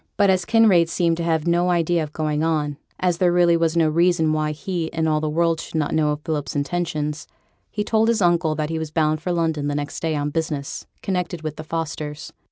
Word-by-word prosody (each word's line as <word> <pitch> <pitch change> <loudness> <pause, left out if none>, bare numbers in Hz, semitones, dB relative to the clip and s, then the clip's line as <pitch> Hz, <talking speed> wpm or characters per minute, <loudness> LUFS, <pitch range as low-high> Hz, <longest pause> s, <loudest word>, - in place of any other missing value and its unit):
But 200 -2 +5
as 185 -2 +1
Kinraid 210 -7 +4
seemed 170 -1 +1
to 170 - -2
have 160 -2 0
no 175 +1 +2
idea 170 -1 +2
of 150 -1 -4
going 155 -1 -1
on, 160 -2 +1
and 145 -1 -6 0.2
as 180 -2 +1
there 180 -1 +4
really 175 -1 +4
was 165 0 +1
no 165 -1 +4
reason 165 0 +2
why 155 0 0
he 170 +1 -4
and 160 -1 -1
all 155 -1 +2
the 155 - -1
world 165 +1 +1
should - - -9
not 155 -2 0
know 155 -1 +2
of 150 0 -2
Philip's 150 -3 -3
intentions, 150 0 -2 0.4
he 210 - -2
told 220 +1 +2
his 230 -1 +2
uncle 170 -4 +2
that 155 0 -2
he 160 - -2
was 160 -1 -4
bound 155 0 +1
for 180 - -2
London 160 -4 0
the 145 - -1
next 145 0 -4
day 160 -1 -1
on 145 0 -1
business 150 -3 -3 0.2
connected 180 -3 -2
with 155 -1 -4
the 155 - -7
Fosters. 155 -1 -5
160 Hz, 235 wpm, -22 LUFS, 155-175 Hz, 0.4 s, But